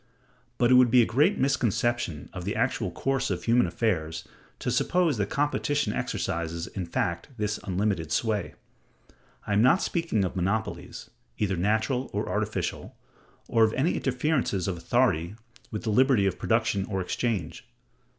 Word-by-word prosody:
But 120 0 +3
it - - +7
would 125 -1 +7
be 125 +1 +6
a - - +2
great 150 - +2
misconception 120 - 0
of - - -6
the - - -3
actual - - 0
course 135 0 -1
of 90 -3 -3
human 120 +1 +3
affairs 80 -7 -2 0.3
to - - -2
suppose 175 -7 +2
that 100 -1 -1
competition 145 -4 0
exercises 85 0 -3
in 95 -4 -6
fact 85 0 -2
this 105 -1 -1
unlimited 95 -4 -1
sway. 110 -3 -1 0.9
I 105 - -1
am 100 - +4
not 130 - +4
speaking 165 - 0
of 95 - -4
monopolies, 100 +5 -3 0.3
either 100 -3 0
natural 110 +8 0
or - - -2
artificial, - - -3 0.5
or 115 - +3
of 110 0 +3
any 155 +7 +1
interferences 125 - 0
of 95 - -1
authority 90 -2 +1 0.3
with 105 - -5
the 110 - -1
liberty 125 -2 +4
of 95 -2 -1
production 110 -3 +1
or 95 -2 -3
exchange. 95 -2 -3
110 Hz, 155 wpm, -27 LUFS, 95-125 Hz, 0.9 s, it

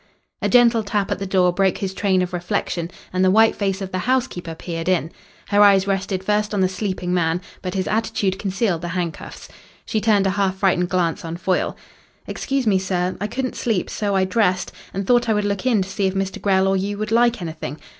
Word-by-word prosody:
A - - 0
gentle 240 -2 +5
tap 205 -1 -2
at 200 - -1
the 195 - -4
door 185 -2 +3
broke 190 0 +1
his 190 -1 -3
train 190 -2 +1
of 180 - -5
reflection, 175 -1 -2 0.2
and 185 0 +1
the 185 - +5
white 220 +3 +5
face 195 -1 -1
of 190 - -6
the 185 - -2
housekeeper 230 -8 -1
peered 165 +1 -4
in. 170 -3 +1 0.4
Her 205 0 +4
eyes 200 -2 +6
rested 195 -1 -1
first 210 +1 0
on 195 - +1
the 185 - +4
sleeping 185 -2 -3
man, 165 -1 +1 0.2
but 185 0 -4
his 190 -1 -1
attitude 215 -3 -1
concealed 195 -3 -1
the 175 - -4
handcuffs. 170 -3 -5 0.4
She 215 - -1
turned 205 -2 +3
a 195 - +2
half 195 -1 0
frightened 185 -2 +1
glance 180 +1 0
on 165 0 -5
Foyle. 185 +1 -1 0.5
"Excuse 270 -2 -2
me, 200 -3 +3
sir. 185 -1 -1
I 210 - 0
couldn't 255 +3 -3
sleep, 220 -7 -1
so 205 -2 -1
I 190 -1 +3
dressed, 185 -2 +1 0.2
and 195 +1 -3
thought 240 +1 +3
I 220 - +3
would 210 0 0
look 200 +4 -1
in 220 -6 +3
to 185 - -9
see 195 0 0
if 190 - -3
Mr. 195 0 -2
Grell 190 -1 +3
or 195 - +2
you 200 +2 -2
would 215 +1 -4
like 235 +1 +3
anything. 160 -4 -6
195 Hz, 225 wpm, -21 LUFS, 185-210 Hz, 0.5 s, eyes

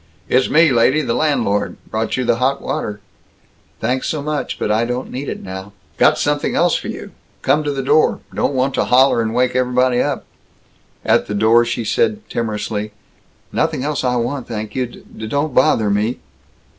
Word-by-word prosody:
"It's 130 +1 +2
me, 160 -1 +5
lady. 130 +5 +3
The 115 - -1
landlord. 120 -10 0
Brought 110 +3 -1
you 125 - -1
the 115 - +2
hot 135 +3 +1
water." 105 0 -4 0.8
"Thanks 125 +3 -1
so 150 -3 -2
much, 150 -1 -3
but - - -1
I 110 +2 +2
don't 125 +2 -3
need 135 +2 -4
it - - -6
now." 95 +1 -7 0.3
"Got - - +5
something - - 0
else - - +3
for - - -3
you. - - -7 0.3
Come 145 +3 +2
to 145 - -1
the 135 -1 -3
door. 150 +4 +3
Don't 140 - 0
want 130 +1 +1
to - - +1
holler 130 -1 +4
and 110 -1 -1
wake 125 0 +1
ev'body 125 0 +2
up." - - -2 0.8
At - - +3
the 105 - -3
door 115 +3 +4
she 120 0 -2
said 215 - 0
timorously, 105 -2 -3 0.6
"Nothing 130 - 0
else 150 -1 -1
I 125 -1 +1
want, 125 +2 -2
thank 110 -2 -5
you. 130 -1 -1
D 110 -2 -10
don't 145 +4 -1
bother 110 -5 +3
me." 105 +5 0
125 Hz, 185 wpm, -18 LUFS, 110-135 Hz, 0.8 s, me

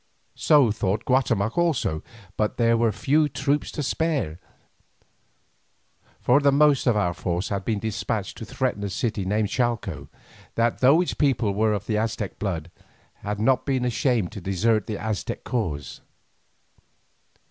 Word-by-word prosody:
So 145 -7 +4
thought 105 +1 -1
Guatemoc 125 - +1
also, 145 - 0 0.3
but 105 -1 -1
there 115 -1 +3
were 115 -1 +2
few 145 +8 +2
troops 145 +2 -1
to 150 - -3
spare, 140 - -1 1.8
for 125 +3 +4
the 140 -1 +4
most 145 -1 +4
of 115 -3 +3
our 90 -4 +1
force 90 +1 -2
had 100 -2 -2
been 110 -3 0
despatched 105 0 -3
to 115 - -6
threaten 125 -3 -2
a 100 - -2
city 105 0 -2
named 105 +1 0
Chalco, 120 -3 -2 0.5
that, 115 0 +1
though 140 +6 +5
its 180 - -1
people 125 -8 +1
were 110 +1 +2
of 100 -1 -3
the 105 -2 0
Aztec 110 -2 -3
blood, 90 -5 -3 0.5
had 105 0 -4
not 125 +4 +2
been 130 -3 0
ashamed 120 - 0
to 105 -3 -8
desert 105 +3 +1
the 105 - -3
Aztec 110 -1 -4
cause. 85 - -3
110 Hz, 150 wpm, -24 LUFS, 100-130 Hz, 1.8 s, though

